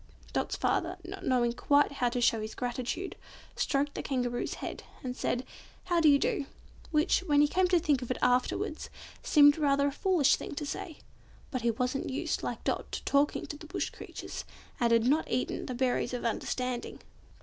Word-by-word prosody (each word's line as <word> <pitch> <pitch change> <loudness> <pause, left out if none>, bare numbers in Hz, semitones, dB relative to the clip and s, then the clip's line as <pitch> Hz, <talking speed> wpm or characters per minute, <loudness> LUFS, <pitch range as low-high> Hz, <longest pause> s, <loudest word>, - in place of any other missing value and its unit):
Dot's - - -1
father, 355 +1 0
not 385 +2 -7
knowing 240 -2 +2
quite 285 +4 +3
how 250 -3 0
to 245 +1 -2
show 230 -2 +3
his 215 +1 -6
gratitude, 250 +9 -3 0.4
stroked 285 0 0
the - - -4
Kangaroo's 245 -3 -2
head, - - -6 0.2
and 250 -1 -3
said, 250 0 -1 0.4
"How 350 -2 +1
do 310 - +6
you 285 - +7
do?" 280 0 -1 0.4
which, 310 +3 +3
when 290 -2 +4
he 295 - +6
came 365 +4 +2
to 360 0 +4
think 300 -6 +2
of 250 - -6
it 255 - -1
afterwards, 250 +1 0 0.3
seemed 290 0 +6
rather 280 -1 +3
a 285 - +1
foolish 345 -1 +3
thing - - -7
to 295 - -3
say. 305 +2 -5 0.5
But 255 -3 -2
he 235 - +2
wasn't 250 +4 -1
used, 260 - -2
like - - -4
Dot, - - -2
to - - -3
talking 285 +1 +2
to - - -6
Bush - - -2
creatures, - - -7 0.4
and 235 -2 +2
had 230 0 +4
not 295 +5 +2
eaten 250 +1 -1
the 255 - -4
berries 250 -1 0
of 245 - -5
understanding. 250 +2 -2
275 Hz, 190 wpm, -30 LUFS, 245-295 Hz, 0.5 s, you